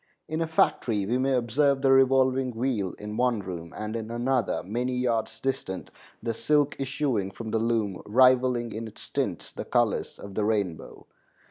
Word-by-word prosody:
In 155 +1 -2
a 165 - 0
factory 115 -9 +1
we 120 +5 0
may 135 0 +2
observe 135 +3 +2
the 135 - +5
revolving 130 -1 +4
wheel 115 -7 -1
in 105 +1 -6
one 125 -2 +2
room 85 -4 -6
and 105 +1 -4
in 110 -1 -4
another, 120 -3 0
many 125 +5 -2
yards 115 -3 -1
distant, 110 -7 -3 0.3
the 115 - -1
silk 145 +4 +2
issuing 135 -7 -1
from 110 +3 -7
the 110 - +1
loom, 110 -4 0
rivaling 125 0 +4
in 115 +1 -5
its 110 - -11
tints - - -2
the - - -6
colors - - 0
of 100 - -9
the 105 - 0
rainbow. 100 -6 -2
120 Hz, 170 wpm, -27 LUFS, 105-130 Hz, 0.3 s, the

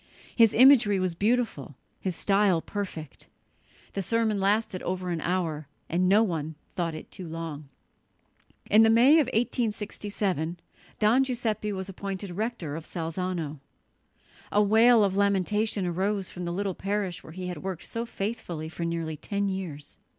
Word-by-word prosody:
"His 225 -3 +5
imagery 235 -6 +6
was 185 -2 0
beautiful, 205 - 0 0.2
his 185 -3 -3
style 195 -3 +3
perfect." 165 -6 -6 0.7
The 195 - -2
sermon 220 +1 +1
lasted 200 -1 +1
over 185 0 -3
an 165 -2 -2
hour, 165 -5 -1 0.2
and 180 +2 +1
no 210 +3 +6
one 160 -6 -3 0.2
thought 165 -3 -2
it - - -10
too 185 - -8
long. 160 -3 -6 1.0
In 215 - +6
the 225 - +6
May 250 +8 +6
of 300 - +2
1867 205 - -2 0.4
Don 225 +5 +4
Giuseppe 230 -5 -2
was 190 -1 -4
appointed 195 0 -5
rector 190 -6 -3
of 160 0 -6
Salzano. 165 -3 -3 0.9
A 210 - +4
wail 225 +2 +6
of 195 -1 +1
lamentation 200 +1 +1
arose 190 +2 -1
from 180 -1 -6
the 170 - -2
little 195 +2 -2
parish 195 -2 -3
where 160 - -11
he 185 +1 -6
had 180 -3 -5
worked 185 -3 -5
so 230 - -4
faithfully 195 -8 -4
for 170 - -6
nearly 165 -2 -2
ten 200 +5 -2
years. 175 -7 -6
190 Hz, 150 wpm, -27 LUFS, 170-210 Hz, 1.0 s, imagery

